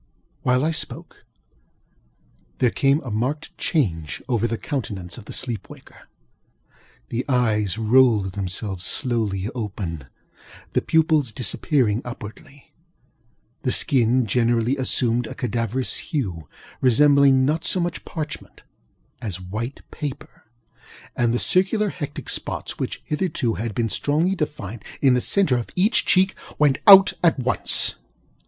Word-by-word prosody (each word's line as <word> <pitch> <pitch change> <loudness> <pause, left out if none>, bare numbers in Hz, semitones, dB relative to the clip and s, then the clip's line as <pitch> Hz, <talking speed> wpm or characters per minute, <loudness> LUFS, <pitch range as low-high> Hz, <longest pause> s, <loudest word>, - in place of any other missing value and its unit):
While 125 +3 +2
I 160 - +1
spoke, 160 - -6 1.3
there 125 -2 +2
came 140 +2 +2
a 130 - -7
marked 130 +9 -3
change 80 - -1
over 120 -3 0
the 115 0 -3
countenance 100 -12 -5
of 105 - -13
the - - -10
sleep 115 -7 -3
waker. - - -15 1.0
The 120 +2 -2
eyes 110 -6 +1
rolled 110 -3 +3
themselves 95 0 -3
slowly 110 -6 -1
open, 95 - -5 0.7
the - - +2
pupils 155 -6 +2
disappearing 120 0 0
upwardly; 125 +5 -11 0.9
the 125 - 0
skin 125 -1 +3
generally 120 +3 +1
assumed 125 -3 0
a - - -8
cadaverous 120 +1 -2
hue, 95 - -4 0.3
resembling 135 +1 +5
not 155 +3 0
so 185 - +1
much 175 -1 -3
parchment 155 -2 -7 0.6
as 100 -7 -5
white 110 +8 -6
paper; 145 -1 -7 0.7
and 120 -2 +1
the 120 - +1
circular 195 - +1
hectic 145 -5 -7
spots - - -4
which, - - -4
hitherto, 150 -7 -1
had 110 -1 -4
been 115 -1 0
strongly 155 - 0
defined 135 - -5 0.2
in 135 -3 +4
the 125 - +2
centre 185 -8 +2
of 120 - -5
each 205 +6 +2
cheek, 190 +1 +3 0.2
went 145 -3 +3
out 195 -1 +9
at 165 -4 +4
once. 130 -1 +4
125 Hz, 130 wpm, -22 LUFS, 110-145 Hz, 1.3 s, out